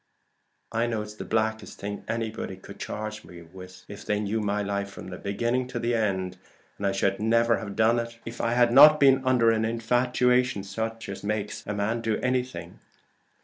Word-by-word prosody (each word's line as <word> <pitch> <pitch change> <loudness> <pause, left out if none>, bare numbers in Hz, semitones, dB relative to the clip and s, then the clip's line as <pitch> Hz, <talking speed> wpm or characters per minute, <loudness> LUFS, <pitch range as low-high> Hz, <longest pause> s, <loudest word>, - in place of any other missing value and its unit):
I 115 +1 0
know 110 -2 -2
it's 105 0 -9
the 105 - -7
blackest 110 -2 -1
thing 100 0 -5
anybody 110 -4 -3
could 100 +1 -12
charge 105 0 -5
me 85 -1 -12
with, 90 +2 -13
if 100 - -9
they 105 0 0
knew 105 +1 -1
my 105 0 -1
life 100 0 -2
from 95 -2 -9
beginning 120 +5 -1
to 120 -1 -2
end; 95 -5 -1 0.4
and 100 - 0
I - - +2
should 95 0 0
never 115 +1 +3
have 100 -3 -7
done 115 +2 +3
it, 115 0 -6
if 115 +1 -6
I 115 - +1
had 120 -1 +3
not 150 +3 +9
been 135 -1 +5
under 125 -3 +4
an 110 0 +1
infatuation 125 0 +1
such 115 +3 -4
as 100 - -7
makes 105 0 -3
a 105 - -2
man 110 +3 -1
do 110 -1 0
anything. 125 -9 -3
110 Hz, 190 wpm, -26 LUFS, 100-120 Hz, 0.4 s, not